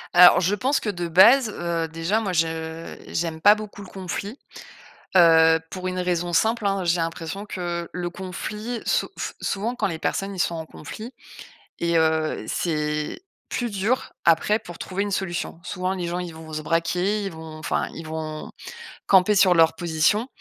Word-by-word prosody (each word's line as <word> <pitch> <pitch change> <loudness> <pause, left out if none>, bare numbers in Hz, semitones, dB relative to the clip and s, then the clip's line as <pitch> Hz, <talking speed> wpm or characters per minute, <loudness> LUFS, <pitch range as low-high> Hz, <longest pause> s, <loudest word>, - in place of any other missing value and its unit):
Alors 180 0 +9
je 190 +3 +1
pense 265 +7 +1
que 215 - -3
de 175 -3 -4
base, 220 +8 +6
heu, 170 -4 -2
déjà 165 +6 -1
moi 200 -5 -2
je 160 0 -2
j'aime 160 -1 -3
pas 205 +4 +8
beaucoup 210 -1 -8
le 190 - -10
conflit, 195 +6 -5 0.8
heu, 165 -2 +6
pour 185 -1 -6
une 185 0 -2
raison 175 -1 -1
simple, 220 +5 +2
hein, 195 -1 0
j'ai 170 +1 +2
l'impression 165 +5 -4
que 175 -3 -4
le 175 -1 -3
conflit, 210 +6 -5
sou - - +1
f - - -4
souvent 225 +5 -2
quand - - 0
les 165 -4 -4
personnes 195 +3 -2
ils 180 - -5
sont 170 - 0
en 160 - -6
conflit 220 - -9 0.7
et 170 0 +1
heu, 160 -1 +1
c'est, 150 - -2 0.3
plus 240 -1 -2
dur, 205 +6 -1
après 170 +6 +4
pour 175 -1 -11
trouver 190 +2 -2
une 205 - -4
solution. 175 -3 -3
Souvent 185 +1 -2
les 180 -2 -3
gens, 175 +1 -2
ils 175 -2 -5
vont 160 0 -10
se 155 0 -3
braquer, 180 +6 0
ils 195 - -3
vont 160 -1 -9
enfin 155 - -1
ils 165 - -8
vont, 155 -1 -5 0.5
camper 195 +2 +5
sur 190 -2 +6
leurs 165 -1 +4
positions 175 +7 +1
175 Hz, 180 wpm, -24 LUFS, 165-200 Hz, 0.8 s, Alors